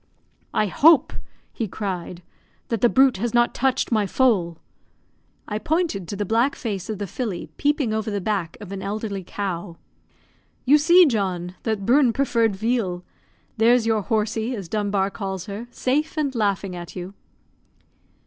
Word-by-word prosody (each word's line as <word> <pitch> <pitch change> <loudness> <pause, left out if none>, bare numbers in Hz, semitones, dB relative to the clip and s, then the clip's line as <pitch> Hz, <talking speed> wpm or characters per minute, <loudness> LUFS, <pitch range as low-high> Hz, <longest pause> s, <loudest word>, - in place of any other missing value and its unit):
"I 215 - +3
hope," 300 - +5 0.4
he 225 - -3
cried, 180 -3 -5 0.5
"that 230 -3 -1
the 240 - +5
brute 265 -3 +4
has 235 +3 -2
not 240 0 +3
touched 260 0 0
my 215 -3 +2
foal!" 190 -9 +2 0.9
I 210 0 -3
pointed 305 - -1
to 205 - -5
the 205 +1 -2
black 230 +7 +2
face 205 -5 -4
of 215 - -3
the 205 - -3
filly 200 -2 -5
peeping 285 -6 +1
over 220 0 -2
the 205 -1 -2
back 195 -4 -2
of 205 -3 -9
an 195 -1 -5
elderly 200 -1 -4
cow. 175 -2 -5 0.9
"You 290 +4 +6
see, 345 +4 +7
John, 185 - -1
that 215 -4 -2
Bruin 255 0 +4
preferred 230 -6 +1
veal; 200 -4 -1 0.5
there's 230 +1 +4
your 220 -2 +2
'horsey,' 220 +2 -1
as 195 -5 -6
Dunbar 200 -1 0
calls 190 -3 -5
her, 210 +4 -7
safe, 300 +7 -1
and 285 -3 0
laughing 200 -5 -1
at 175 -1 -8
you." 180 +1 -6
215 Hz, 160 wpm, -23 LUFS, 195-245 Hz, 0.9 s, see